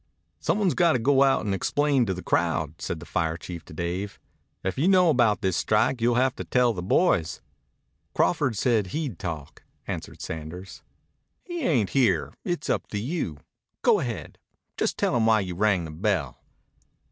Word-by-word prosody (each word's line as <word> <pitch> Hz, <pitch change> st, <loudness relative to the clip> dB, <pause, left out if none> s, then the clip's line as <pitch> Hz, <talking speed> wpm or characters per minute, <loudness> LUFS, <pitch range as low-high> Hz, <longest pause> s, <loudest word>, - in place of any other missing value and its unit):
"Some -, -, 0 dB
one's 195 Hz, -6 st, +2 dB
got 170 Hz, +2 st, +3 dB
to -, -, +2 dB
go 135 Hz, +3 st, +3 dB
out 135 Hz, -4 st, +3 dB
and 100 Hz, -, 0 dB
explain 140 Hz, +5 st, +1 dB
to 95 Hz, -, 0 dB
the 90 Hz, -, -7 dB
crowd," 80 Hz, 0 st, 0 dB
said 80 Hz, -, -3 dB
the 85 Hz, -, -10 dB
fire 80 Hz, -1 st, -1 dB
chief 85 Hz, -2 st, -8 dB
to -, -, -12 dB
Dave. 90 Hz, +5 st, -3 dB, 0.4 s
"If 95 Hz, -, -1 dB
you 160 Hz, -, +3 dB
know 185 Hz, -3 st, +5 dB
about 120 Hz, -6 st, +3 dB
this 95 Hz, -4 st, 0 dB
strike 110 Hz, -, +1 dB
you'll 120 Hz, +1 st, +3 dB
have 130 Hz, +1 st, +2 dB
to -, -, -4 dB
tell 125 Hz, -2 st, +2 dB
the 90 Hz, -, -5 dB
boys." 90 Hz, -, +2 dB, 0.8 s
"Crawford 110 Hz, +6 st, +1 dB
said 110 Hz, -3 st, +2 dB
he'd 130 Hz, -, -4 dB
talk," 80 Hz, -6 st, -6 dB, 0.2 s
answered -, -, -6 dB
Sanders. 80 Hz, +4 st, -7 dB, 0.6 s
"He 345 Hz, -2 st, -5 dB
ain't 125 Hz, -, +1 dB
here. 130 Hz, -4 st, +2 dB
It's 175 Hz, -1 st, -3 dB
up -, -, -1 dB
to 105 Hz, -, -4 dB
you. 115 Hz, -, -3 dB, 0.5 s
Go -, -, +5 dB
ahead. -, -, -5 dB, 0.4 s
Just -, -, -1 dB
tell -, -, +1 dB
'em 115 Hz, -2 st, +2 dB
why 110 Hz, -1 st, +4 dB
you 90 Hz, -2 st, -4 dB
rang 95 Hz, -2 st, +1 dB
the 80 Hz, -, -7 dB
bell." 95 Hz, +3 st, -1 dB
105 Hz, 180 wpm, -26 LUFS, 90-135 Hz, 0.8 s, know